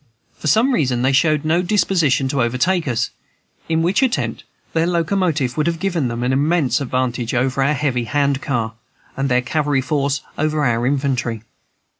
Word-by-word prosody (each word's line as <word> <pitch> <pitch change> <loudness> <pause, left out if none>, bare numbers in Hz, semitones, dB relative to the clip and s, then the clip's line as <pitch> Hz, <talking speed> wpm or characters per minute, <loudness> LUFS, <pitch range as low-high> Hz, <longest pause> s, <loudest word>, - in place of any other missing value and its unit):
For - - -4
some 235 - +3
reason 125 - +1
they 130 - +3
showed 150 +2 +2
no 165 +3 +2
disposition 175 -8 +2
to 135 -1 0
overtake 145 +9 +1
us, 120 -2 -1 0.6
in 165 0 +1
which 185 +8 +2
attempt 260 -3 -1 0.3
their 165 +1 +1
locomotive 170 -6 0
would 155 +1 +1
have 170 -1 0
given 170 -8 0
them 120 0 -3
an 125 +1 +1
immense 145 0 +1
advantage 125 -2 -2
over 130 +2 0
our 145 +3 +2
heavy 130 -4 -1
hand 140 +2 0
car, 115 -5 -2 0.4
and 135 0 -1
their 125 0 +2
cavalry 145 0 0
force 140 +1 -1 0.2
over 155 0 +1
our 120 0 +1
infantry. 130 -5 -1
140 Hz, 170 wpm, -19 LUFS, 125-160 Hz, 0.6 s, some